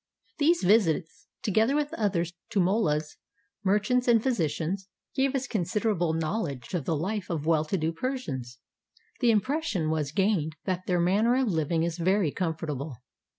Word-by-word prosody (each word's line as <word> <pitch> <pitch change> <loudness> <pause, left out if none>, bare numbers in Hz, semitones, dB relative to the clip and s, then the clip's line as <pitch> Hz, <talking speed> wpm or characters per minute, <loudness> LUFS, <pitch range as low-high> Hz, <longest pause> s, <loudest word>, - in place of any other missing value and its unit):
These 330 +4 +3
visits, 180 -3 +2 0.2
together 220 +6 +2
"with 295 0 0
others 175 -5 0 0.2
to 205 - 0
mollas, 165 -6 +1 0.5
mer 200 +1 +4
chants, 250 +4 0
and 230 -2 +5
physicians, 185 - -1 0.3
gave 270 0 +1
us 270 0 0
considerable 200 -4 0
knowledge 160 - -3
of 170 -7 -1
the 165 - 0
life 195 +6 -3
of 160 -4 -2
well 160 -1 +3
to 190 - -1
do 160 -1 0
Persians. 155 - -4 0.6
The 245 - +3
impression 220 - +1
was 150 -3 -1
gained 170 -4 +1
that 185 -1 -2
their 180 -1 +2
manner 205 +8 +3
of 260 -3 +2
living 160 -1 +1
is 170 0 -2
very 185 -2 +2
comfortable. 155 -6 -3
185 Hz, 155 wpm, -28 LUFS, 160-220 Hz, 0.6 s, and